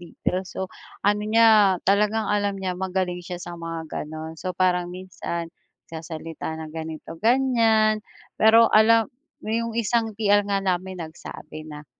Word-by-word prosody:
details. 180 +2 -3
So, 190 -1 -4 0.3
ano 205 +1 +3
niya, 215 -2 +5
talagang 210 +2 +2
alam 205 -1 0
niya, 190 -1 -2
magaling 180 -1 -2
siya 180 0 -6
sa 175 -1 -8
mga 165 -1 -5
gano'n. 155 +1 -6
So, 185 -1 -4
parang 180 -1 +2
minsan 175 -2 -6 0.3
nagsasalita 160 0 -7 0.2
ng 155 - -10
ganito-ganyan. 215 +7 +1 0.4
Pero 225 +1 +6
alam 225 +4 +5 0.3
'yong 230 +1 -2
isang 225 -1 0
TL 205 -1 +3
nga 195 -1 0
namin 185 0 -1
nagsabi 155 -1 -10
na 150 -1 -9
190 Hz, 135 wpm, -24 LUFS, 170-215 Hz, 0.4 s, Pero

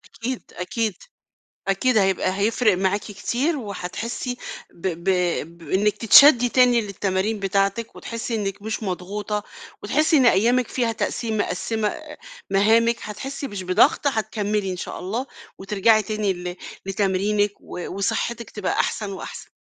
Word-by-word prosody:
أكيد، 250 +2 -5
أكيد، 215 +3 -1 0.8
أكيد 220 +4 +2
هيبقى 190 -1 +1
هيفرق 220 0 +3
معاكِ 190 +2 +1
كتير، 245 - -2
وهتحسِّي 230 +3 -4 0.4
ب 175 - -6
ب 170 -1 -3 0.5
بإنِّك 190 +6 0
تتشدِّي 245 +2 +7
تاني 245 -1 +4
للتمارين 200 +1 -1
بتاعتِك، 200 +3 0
وتحسِّي 230 0 -5
إنِّك 200 -2 -3
مش 220 +1 -4
مضغوطة، 205 +2 -3 0.4
وتحسِّي 305 +9 +2
إن 260 - +5
أيامِك 240 +4 +3
فيها 235 -3 0
تقسيم 220 0 -2
مقسّمة 210 +3 -2 0.3
مهامِك، 225 +4 +4
هتحسي 270 +7 -5
مش 200 -2 -5
بضغط 185 +11 +3
هتكمّلي 210 -4 -1
إن - - -5
شاء - - -6
الله، 225 +8 -3 0.3
وترجعي 210 +3 +3
تاني 210 -1 -1
ل 180 0 -6 0.3
لتمرينِك 205 +1 +1
و - - -9 0.2
وصحتِك 235 +3 -2
تبقى 210 -3 -2
أحسن 210 -3 -1
وأحسن. 190 - -8
210 Hz, 130 wpm, -23 LUFS, 195-230 Hz, 0.8 s, تتشدِّي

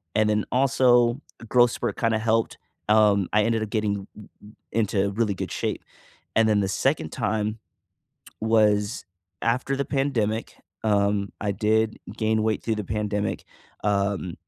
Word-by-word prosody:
and 110 0 +3
then, 105 0 +1
also, 125 -1 +3 0.3
growth 120 -1 +5
spurt - - -3
kinda 115 -1 +1
helped. 115 0 0 0.3
Um, 105 -3 +4
I 105 0 +4
ended 115 0 +1
up 110 - -5
getting 105 -2 -1
r 105 - -10 0.2
r 105 - -13 0.2
into 100 -3 +1
really 105 0 0
good - - -5
shape, - - -3 0.5
and 115 0 +4
then 105 -1 +3
the 95 - 0
second - - 0
time 110 +1 -2 0.8
was 105 -1 +2 0.4
after 125 +4 0
the 140 - -1
pandemic, 120 -7 -1 0.3
um, 100 -1 +1
I 105 - -1
did 110 +2 +1 0.2
gain 110 -1 +1
weight 110 -1 0
through 110 -2 0
the 105 - -3
pandemic. 105 +1 -2 0.4
Um, 100 -3 0
110 Hz, 150 wpm, -25 LUFS, 105-115 Hz, 0.8 s, growth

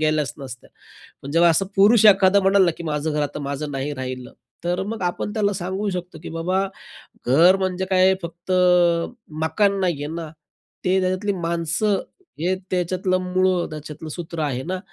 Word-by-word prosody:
गेल्याच 155 -2 +1
नसत्या. 130 -3 -10 0.5
पण 140 - -7
जेव्हा 170 +2 +5
असं 180 +4 +2
पुरुष 210 +3 +5
एखादा 195 -1 +6
म्हणाला 195 0 +4
ना, 170 - +2
की 170 - -7
"माझं 150 0 -2
घर 150 0 -1
आता 145 0 -3
माझं 145 +1 -4
नाही 135 +2 -3
राहिलं," 130 -2 -6 0.3
तर 180 +2 -1
मग 220 0 -5
आपण 180 +3 -2
त्याला, 205 -2 +1
सांगू 190 +2 -3
शकतो, 180 -3 -6
की - - -6
"बाबा, 180 +4 -1 0.6
घर 165 +9 +6
म्हणजे, 190 0 -1
काय 185 0 +4
फक्त 170 +2 -7 0.9
मकान 195 +5 +1
नाही 175 -6 -1
आहे 150 +2 -5
ना, 165 -2 -5 0.6
ते 190 +1 +3
त्याच्यातली 185 +3 0
माणसं, 170 +4 0 0.4
हे 175 +4 +1 0.2
त्याच्यातलं 185 +1 0
मूळं 185 -1 +1
त्याच्यातलं 155 0 -8
सूत्र 170 0 -6
आहे 130 -4 -2
ना? 185 +1 -2
175 Hz, 170 wpm, -22 LUFS, 155-190 Hz, 0.9 s, एखादा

